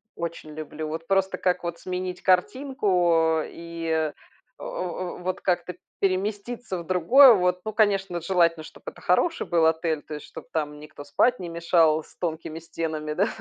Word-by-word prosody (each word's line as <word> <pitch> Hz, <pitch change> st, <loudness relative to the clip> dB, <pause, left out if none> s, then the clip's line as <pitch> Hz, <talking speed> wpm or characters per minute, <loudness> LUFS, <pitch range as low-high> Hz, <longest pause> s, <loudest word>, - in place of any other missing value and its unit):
очень 165 Hz, -2 st, -6 dB
люблю. 155 Hz, 0 st, -6 dB
Вот 160 Hz, +1 st, -5 dB
просто, 195 Hz, 0 st, +1 dB
как 180 Hz, -1 st, 0 dB
вот 170 Hz, -1 st, -4 dB
сменить 180 Hz, 0 st, -4 dB
картинку, 180 Hz, -, +2 dB
э, -, -, -6 dB
и, 170 Hz, 0 st, -7 dB
э 160 Hz, -1 st, +1 dB, 0.5 s
э -, -, -9 dB
э, 180 Hz, 0 st, -4 dB
вот 185 Hz, +1 st, -2 dB
как-то 180 Hz, -1 st, -1 dB, 0.2 s
переместиться 200 Hz, +2 st, -2 dB
в 170 Hz, -, -8 dB
другое, 235 Hz, -, +7 dB
вот. 180 Hz, -2 st, +1 dB
Ну, 215 Hz, -, -2 dB
конечно, 195 Hz, -5 st, +2 dB
желательно, 170 Hz, -2 st, +2 dB
чтобы -, -, -14 dB
это -, -, -17 dB
хороший 325 Hz, -, +1 dB
был 170 Hz, -2 st, +3 dB
отель, 160 Hz, -1 st, +1 dB
то 150 Hz, -, -8 dB
есть 150 Hz, -, -9 dB
чтобы -, -, -11 dB
там 150 Hz, -2 st, -3 dB
никто 150 Hz, -1 st, -11 dB
спать 245 Hz, +12 st, +2 dB
не 180 Hz, -, -5 dB
мешал 165 Hz, -2 st, +3 dB
с -, -, -21 dB
тонкими 160 Hz, -1 st, -4 dB
стенами, 155 Hz, -2 st, -4 dB
да? 195 Hz, +6 st, +2 dB
175 Hz, 175 wpm, -25 LUFS, 160-185 Hz, 0.5 s, другое